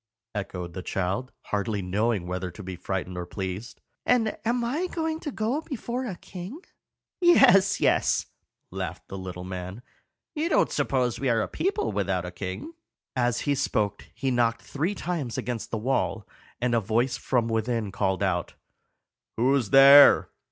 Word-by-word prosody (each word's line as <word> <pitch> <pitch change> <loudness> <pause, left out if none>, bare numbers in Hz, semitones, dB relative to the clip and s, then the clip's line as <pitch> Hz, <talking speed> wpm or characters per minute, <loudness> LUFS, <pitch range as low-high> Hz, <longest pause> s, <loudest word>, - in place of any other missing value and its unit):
echoed 90 -4 -5
the 95 - -5
child, 95 +8 -2
hardly 105 0 -2
knowing 100 +1 0
whether 90 +1 -3
to 95 +4 -10
be 95 0 -6
frightened 90 0 -4
or 90 -1 -4
pleased. 95 +5 -5 0.2
"And 225 -3 +2
am 240 +1 0
I 295 +10 -1
to 320 -3 -3
go 240 +6 -1
before 255 -4 -4
a 195 - -4
king?" 185 - -8 0.6
"Yes, 195 - +6
yes," - - +2 0.5
laughed - - -5
the 95 - -6
little 90 -1 -6
man. 95 +4 -6 0.5
"You 315 +2 -1
don't - - +3
suppose 125 -3 0
we 135 - 0
are 115 -2 +2
a - - -3
people 365 - -1
without 95 -3 -1
a 90 - -5
king?" 95 - -6 0.4
As 120 -2 +1
he 145 - +1
spoke 110 -7 -1
he 135 -1 -1
knocked 115 -1 +1
three 165 +8 -2
times 160 - -3
against 120 -2 -3
the 115 - -2
wall, 115 -3 -1 0.3
and 125 0 0
a 115 - +4
voice 115 +4 0
from 120 -3 0
within 115 -2 -1
called 95 -1 0
out, 90 -3 -1 0.8
"Who's 125 -1 +2
there? 140 +1 +8
120 Hz, 160 wpm, -26 LUFS, -, 0.8 s, there